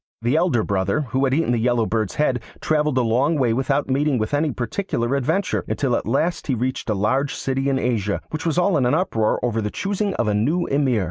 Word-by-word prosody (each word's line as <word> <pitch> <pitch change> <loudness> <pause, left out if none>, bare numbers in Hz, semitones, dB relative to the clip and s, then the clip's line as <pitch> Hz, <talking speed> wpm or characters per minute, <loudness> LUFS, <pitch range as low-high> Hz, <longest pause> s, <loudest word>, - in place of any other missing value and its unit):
The 120 +5 +1
elder 160 -9 +2
brother, 100 +9 0
who 130 +2 +2
had 130 - +1
eaten 160 -5 +1
the 120 - +1
Yellow 120 -1 +2
Bird's 110 -2 -1
head, 130 -5 +1 0.2
travelled 150 -3 +1
a 125 - +3
long 130 +8 +2
way 125 -6 +2
without 135 +3 0
meeting 140 +1 +1
with 110 +4 -2
any 150 +2 +2
particular 120 - -2
adventure, 160 +9 0
until 130 -4 0
at - - -3
last 160 +9 0
he 135 - +1
reached 125 +1 -3
a 105 - +1
large 130 +8 0
city 135 +1 -1
in 135 - +1
Asia, 105 -6 -1
which 155 - -4
was 165 -1 -1
all 180 -1 +3
in 130 -4 +2
an 125 - +2
uproar 115 - +1
over 115 -2 0
the 105 - -2
choosing 200 - -2
of 120 - 0
a 105 - +2
new 150 +13 +1
Emir. 135 -5 +1
130 Hz, 230 wpm, -22 LUFS, 115-150 Hz, 0.2 s, a